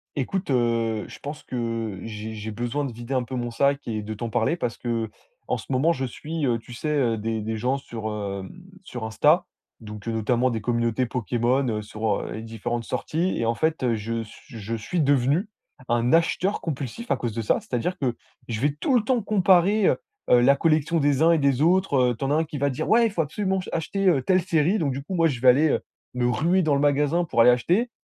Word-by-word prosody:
Écoute 165 +5 -2
heu, 115 -3 +1
je - - -11
pense 145 +2 -7
que 115 -5 -3
j'ai 110 0 -6
j'ai 110 0 -6
besoin 120 +6 -2
de 135 - -4
vider 120 +3 -6
un 130 - +2
peu 125 +2 -7
mon 120 -1 -2
sac 140 +4 +1
et 110 -2 -3
de 105 +1 -6
t'en 115 +2 -4
parler. 115 +7 +1
Parce 125 -8 -3
qu'en 120 - -4
ce - - -7
moment, 140 +6 +3
je 130 - -3
suis 155 +5 -4
heu, 120 -2 +1
tu 120 +2 -12
sais, 155 - -4
heu, 120 -6 +2
des 110 +1 -2
des 110 +1 -3
gens 125 +5 0
sur 115 -5 -6
heu, 100 -2 -4 0.4
sur 120 -8 -6
Insta. 150 +10 +3 0.3
Donc 105 -2 -9
heu, - - 0
notamment 120 +3 +1
des 115 -2 -2
communautés 120 +2 0
Pokémon 125 +3 0
heu, - - -3
sur 105 0 -2
heu, - - -5
les 110 - -6
différentes 115 +1 -4
sorties. 170 +10 -1
Et 115 - 0
en 115 - +1
fait 160 +4 0
heu, 120 -2 +2
je 115 +2 -3
suis 115 +1 -12
je 110 +3 -4
suis 115 +10 -2
devenu 145 - +2 0.4
un 120 +1 +1
acheteur 170 +4 +2
compulsif 155 - -5
à - - +3
cause 120 -2 -3
de 115 - -2
ça. 110 - +1
C'est-à-dire 130 +9 -2
que 130 -6 0 0.3
je 110 -3 -3
vais 145 +2 +1
tout 265 - +1
le 240 - +4
temps 235 0 +1
comparer 195 0 +3
heu - - +3 0.3
heu 125 - +7
la 135 +3 +6
collection 160 +1 +2
des 145 0 +2
uns 165 - +6
et 165 - +3
des 140 -1 +2
autres 180 0 +3 0.2
heu. - - -8
Tu - - -12
en - - -1
as - - +3
un 160 +2 +2
qui 150 -2 -6
va 140 +1 +1
dire: 140 +4 -3
«Ouais, 230 +1 +5
il - - 0
faut 175 -5 0
absolument, 190 +5 -1
ch - - -11
acheter 195 +5 -1
heu, 155 -7 +4
telle 185 +4 +3
série». 170 +2 +2
Donc 145 -5 0
du 135 +2 -4
coup, 170 +7 -6
moi, 165 -2 +3
je 135 -7 -1
vais 130 - +4
aller 145 +6 +6
heu, - - +1 0.3
me 125 -1 +1
ruer 170 +9 +2
dans 155 -4 +2
le 140 - +1
magasin 145 +4 +2
pour 155 - 0
aller 120 - +8
acheter. 175 - +1
130 Hz, 240 wpm, -24 LUFS, 115-160 Hz, 0.4 s, aller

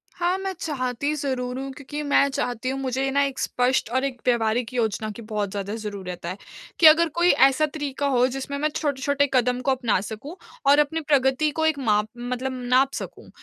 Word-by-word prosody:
हाँ, 355 +2 0
मैं 385 0 -3
चाहती 275 -1 -2
ज़रूर 260 -3 -3
हूँ 270 0 -5
क्योंकि 290 +2 -6
मैं 285 -1 +3
चाहती 250 -2 -2
हूँ, 270 +1 -2
मुझे 265 0 -1
ना 280 +1 +2
एक 275 -1 -4
स्पष्ट 250 -2 0
और 260 +2 +1
एक 260 -3 -4
व्यावहारिक 235 0 +1
योजना 220 -3 -1
की 210 - -10
बहुत 210 -3 -3
ज़्यादा 200 +1 -4
जरूरत 200 -5 -6
है। 175 +2 -3 0.4
कि 325 - +9
अगर 330 +2 +7
कोई 345 +1 +3 0.2
ऐसा 275 +3 +1
तरीका 290 -2 -4
हो 250 -3 +3
जिसमें 270 +2 -4
मैं 300 +2 0
छोटे-छोटे 285 -1 0
कदम 250 0 +2
को 270 - +1
अपना 245 -7 +1
सकूँ 220 - -7 0.3
और 285 +1 +6
अपनी 320 +2 +1
प्रगति 275 +1 +3
को 320 +1 -1
एक 315 -3 +1
माप 210 -4 +1
मतलब 250 +2 -3 0.2
नाप 265 +2 +4
सकूँ। - - -7
265 Hz, 195 wpm, -24 LUFS, 240-285 Hz, 0.4 s, कि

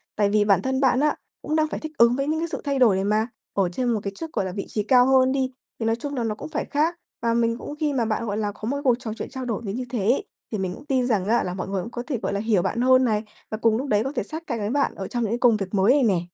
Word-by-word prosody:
Tại 205 -1 +2
vì 210 0 +3
bản 200 -3 +4
thân 265 +4 -1
bạn 260 -1 +4
á 300 +1 +2 0.3
cũng 305 - -2
đang 310 0 +3
phải - - -4
thích 315 - -6
ứng 235 +1 +5
với 275 +1 -1
những 315 +1 0
cái 335 - -1
sự - - -4
thay 280 -2 -1
đổi 230 -6 +5
này 190 - 0
mà, 215 +2 +2 0.3
ở 195 -3 +1
trên 245 +8 -1
một 220 - 0
cái 200 - -3
chức, 320 +8 -7
gọi - - 0
là, 185 - -3
vị 195 +1 -4
trí 210 - -1
cao 250 +3 +5
hơn 260 -1 +5
đi, 260 -1 0 0.3
thì 225 - -2
nói 225 0 +2
chung 285 +4 -5
là 245 - -1
nó 220 -2 -1
cũng 210 - -8
phải 310 - -2
khác. 310 +4 +1 0.3
Và 230 0 +1
mình 230 0 +1
cũng 285 - -7
khi 300 -2 0
mà 245 -4 +1
bạn, 220 +1 -1
gọi 205 -2 -2
là, 210 -1 -1
có 215 +1 -7
một 280 +4 -1
cái 285 - -6
cuộc 250 -4 +4
trò 230 -4 -5
chuyện - - -5
trao 260 -1 -6
đổi 230 -4 -2
đến 200 +1 -3
như 250 +1 -3
thế 240 -2 -2
ấy, 225 +7 +1 0.3
thì 215 - -1
mình 190 -2 -2
cũng 275 - -14
tin 260 -3 +1
rằng 210 -7 +1
á 235 +2 +3
là 180 - -3
mọi 185 0 -4
người 195 -1 -2
cũng 235 - -8
có 240 - -5
thể, 280 -5 -1
gọi - - -1
là, 200 - -1
hiểu 215 -3 +2
bạn 230 - -1
hơn 255 +1 +5
này, 215 -2 +1 0.3
và 215 - -2
cùng 225 0 +2
lúc 270 +4 -3
đấy 210 -3 +2
có 270 - -3
thể - - 0
sát 320 +1 -7
cánh 235 -4 -2
với 205 0 -2
bạn 280 +3 +1
ở 190 - -5
trong 240 -1 -2
những 215 - -1
cái 235 - -1
công 240 -3 +5
việc 195 -1 -5
mới 200 +5 +4
này 285 -1 +3
nè. 195 -7 +3
235 Hz, 355 wpm, -24 LUFS, 210-265 Hz, 0.3 s, ứng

